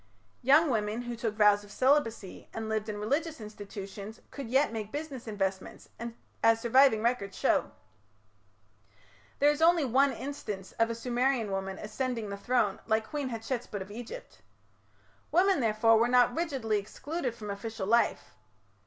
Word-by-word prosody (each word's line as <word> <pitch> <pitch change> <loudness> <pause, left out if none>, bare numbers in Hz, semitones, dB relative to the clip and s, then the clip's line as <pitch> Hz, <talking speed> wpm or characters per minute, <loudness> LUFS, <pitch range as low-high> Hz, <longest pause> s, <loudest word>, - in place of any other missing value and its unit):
Young 285 +4 +5
women 215 +1 -1
who 240 0 -5
took 225 -2 -3
vows 210 -1 +5
of 205 - -14
celibacy 255 -8 +1
and 225 0 -4
lived 220 0 -2
in 210 - -4
religious 295 +9 -1
institutions 205 0 -8
could 275 -5 -7
yet 265 0 +2
make 215 -2 -5
business 285 -4 -6
investments, 195 -3 -3 0.5
as 225 0 +5
surviving 235 -1 +4
records 235 -5 -1
show. - - +2 1.7
There 290 +1 +5
is 295 +1 -4
only 335 -2 +5
one 270 +3 +3
instance 215 -10 -6
of 230 0 +3
a 230 - -2
Sumerian 245 -1 0
woman 195 0 -3
ascending 230 0 -3
the 200 - -4
throne, 215 -2 +1
like 220 0 +1
Queen 290 -3 -2
Hatshepsut 230 -2 -4
of 190 +1 -8
Egypt. 245 - -9 0.9
Women, 375 0 +4
therefore, 225 -1 +4
were 230 - +4
not 245 0 +4
rigidly 265 -11 0
excluded 260 +5 -4
from 210 -3 -6
official 200 0 -5
life. 235 +4 +1
230 Hz, 150 wpm, -30 LUFS, 210-265 Hz, 1.7 s, Young